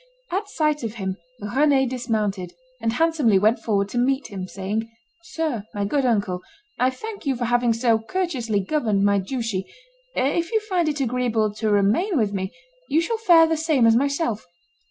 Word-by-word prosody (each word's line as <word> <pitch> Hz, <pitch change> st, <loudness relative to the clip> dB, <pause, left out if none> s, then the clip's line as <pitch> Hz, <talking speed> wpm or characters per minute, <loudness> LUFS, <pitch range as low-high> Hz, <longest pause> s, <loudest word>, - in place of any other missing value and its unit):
At 400 Hz, +3 st, -2 dB
sight 305 Hz, -5 st, 0 dB
of 225 Hz, -2 st, -4 dB
him 190 Hz, -3 st, -3 dB, 0.2 s
Rend 265 Hz, +4 st, +2 dB
dismounted, 210 Hz, -7 st, -2 dB, 0.3 s
and 225 Hz, 0 st, 0 dB
handsomely 300 Hz, -8 st, +3 dB
went 215 Hz, +4 st, +3 dB
forward 200 Hz, -3 st, 0 dB
to 240 Hz, -, -1 dB
meet 270 Hz, +3 st, +1 dB
him, 190 Hz, -2 st, -5 dB
saying, 205 Hz, +4 st, -3 dB, 0.3 s
"Sir, 310 Hz, -10 st, -3 dB
my 205 Hz, 0 st, -1 dB
good 275 Hz, +6 st, 0 dB
uncle, 200 Hz, -6 st, 0 dB, 0.4 s
I 250 Hz, +1 st, +4 dB
thank 405 Hz, +6 st, -7 dB
you 270 Hz, -, +2 dB
for 240 Hz, 0 st, -2 dB
having 240 Hz, 0 st, +2 dB
so 230 Hz, -1 st, +2 dB
courteously 240 Hz, -, -1 dB
governed 215 Hz, -3 st, 0 dB
my 200 Hz, 0 st, +3 dB
duchy; 215 Hz, -2 st, -3 dB, 0.5 s
if 330 Hz, +6 st, 0 dB
you 445 Hz, -, +3 dB
find 365 Hz, -6 st, 0 dB
it 295 Hz, -1 st, -2 dB
agreeable 235 Hz, -4 st, 0 dB
to 215 Hz, +1 st, -2 dB
remain 210 Hz, -, +2 dB
with 210 Hz, -4 st, +1 dB
me, 190 Hz, -1 st, -3 dB, 0.4 s
you 305 Hz, -, +3 dB
shall 445 Hz, +8 st, -1 dB
fare 345 Hz, -7 st, +6 dB
the 325 Hz, 0 st, +1 dB
same 310 Hz, -6 st, +2 dB
as 225 Hz, 0 st, +6 dB
myself." 280 Hz, -3 st, 0 dB
240 Hz, 175 wpm, -23 LUFS, 210-300 Hz, 0.5 s, fare